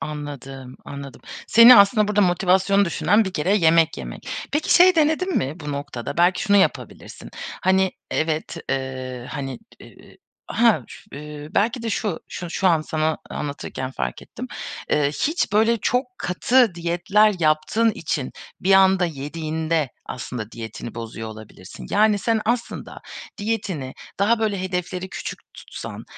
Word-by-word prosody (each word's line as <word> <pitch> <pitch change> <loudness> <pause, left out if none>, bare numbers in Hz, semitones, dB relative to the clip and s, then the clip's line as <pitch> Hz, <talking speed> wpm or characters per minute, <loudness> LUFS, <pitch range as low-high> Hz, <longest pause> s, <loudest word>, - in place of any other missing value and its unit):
Anladım. 135 -3 -7
Anladım. 140 -1 -9 0.3
Seni 235 +2 +9
aslında 210 +1 +5
burada 210 0 +2
motivasyonu 190 +2 +3
düşüren 205 +4 +2
bir 190 - -4
kere 180 +4 +1
yemek 165 -2 +3
yemek. - - -8 0.2
Peki, 300 +2 +2
şey 365 +1 +7
denedin 320 +4 +1
mi 145 +6 -2
bu 150 -1 -5
noktada? 140 -4 -5
Belki 175 +2 +3
şunu 205 -1 +3
yapabilirsin. 195 - -1 0.3
Hani, 190 0 +3 0.2
evet, 160 -1 -1
eee, 130 -2 -4
hani, 135 -2 -5 0.2
t - - -13
e - - -17 0.3
ha 225 - +2
ş - - -12
eee, 150 +1 -8
belki 230 +4 +1
de 230 - -2
şu 205 -5 -2
şu 175 -1 -6
şu 190 - 0
an 165 -3 +3
sana 155 0 -1
anlatırken 140 -3 -5
fark 65 - -4
ettim. - - -8 0.4
Eee, 150 -1 +3
hiç, 290 - -1
böyle, 225 +3 +4
çok 250 +4 0
katı 230 +3 +2
diyetler 180 +5 +2
yaptığın 160 +8 +2
için 150 -8 -3 0.3
bir 195 - +2
anda 190 -1 +5
yediğinde 155 0 -2 0.2
aslında 120 -3 -6
diyetini 115 0 -7
bozuyor 115 -1 -6
olabilirsin. 110 -4 -11
Yani, 210 0 +3
sen 225 +1 0
aslında 235 +2 -3 0.4
diyetini 200 -11 -3 0.2
daha, 225 +4 +3
böyle, 210 -3 -1
hedefleri 180 0 -3
küçük - - -6 0.2
tutsan, - - -9
175 Hz, 145 wpm, -22 LUFS, 145-210 Hz, 0.4 s, Seni